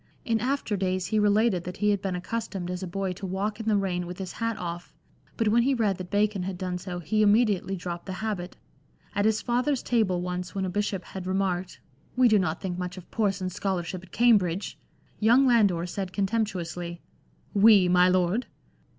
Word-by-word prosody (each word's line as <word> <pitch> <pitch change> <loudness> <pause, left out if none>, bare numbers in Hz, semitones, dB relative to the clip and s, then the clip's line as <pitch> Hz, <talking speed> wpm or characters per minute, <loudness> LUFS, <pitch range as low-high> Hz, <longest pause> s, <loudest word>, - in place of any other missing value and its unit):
In 225 -1 +1
after 255 -2 -1
days 185 -1 -1
he 215 +3 +1
related 210 -2 +3
that 180 +1 -7
he 210 0 +2
had 200 -2 0
been 195 -2 -2
accustomed 190 -1 -4
as 180 0 -4
a 185 - -4
boy 190 +1 -2
to 195 +2 -7
walk 200 +4 -2
in 225 - -6
the 215 -2 +3
rain 180 -3 -1
with 180 0 -7
his 190 -2 -5
hat 230 -1 -2
off; 175 0 -6 0.4
but 225 -3 +2
when 235 +3 +4
he 270 +3 +2
read 210 -6 0
that 180 -1 -6
Bacon 205 0 +1
had 185 0 -4
done 180 -1 -3
so 180 -1 -6
he 175 +6 0
immediately 205 -3 +3
dropped 175 -1 -6
the 190 - -4
habit. 190 -3 -4 0.6
At 205 - +1
his 215 -1 +2
father's 250 +3 0
table 215 -7 +1
once 180 +1 -4
when 190 -1 -1
a 185 - -3
bishop 200 -1 -1
had 185 -1 -7
remarked, 185 -1 -1 0.4
"We 255 0 +5
do 215 -3 +5
not 170 -3 -1
think 180 -2 -3
much 180 +1 -4
of 180 - -12
Person's 195 -4 -1
scholarship 185 -2 -2
at 185 - -17
Cambridge," 205 -6 +2 0.4
young 235 +5 +5
Landor 205 -9 +3
said 185 +1 -5
contemptuously, 180 -5 -2 0.3
" - - -35 0.2
We, 200 -5 +6
my 180 0 +5
Lord?" 185 +6 +1
195 Hz, 200 wpm, -27 LUFS, 180-215 Hz, 0.6 s, We